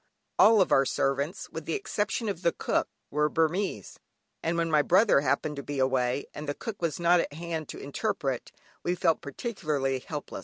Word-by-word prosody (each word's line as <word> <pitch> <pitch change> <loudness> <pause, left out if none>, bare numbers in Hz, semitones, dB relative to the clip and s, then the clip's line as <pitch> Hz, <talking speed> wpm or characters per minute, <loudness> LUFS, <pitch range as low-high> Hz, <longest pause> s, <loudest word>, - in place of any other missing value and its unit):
All 215 -4 +7
our 135 - +6
servants, 140 +4 -1
with - - -6
the - - -1
exception 230 - -2
of 195 -4 -3
the 170 - +3
cook, - - 0 0.2
were 150 +1 +2
Burmese, 165 - -1 0.4
and 165 +1 -1
when 165 -1 0
my 150 -1 +5
brother 185 0 +4
happened 150 0 0
to - - -3
be 145 0 -5
away, 130 0 +1
and 150 0 -6
the 145 - -1
cook 220 -5 -6
was 165 -1 -1
not 175 +1 +5
at 155 - -2
hand 160 -1 -4
to - - -7
interpret, 135 -2 -3 0.3
we 175 - 0
felt 165 -2 +2
particularly 145 - -2
helpless. 150 +3 -6
155 Hz, 185 wpm, -28 LUFS, 140-175 Hz, 0.4 s, All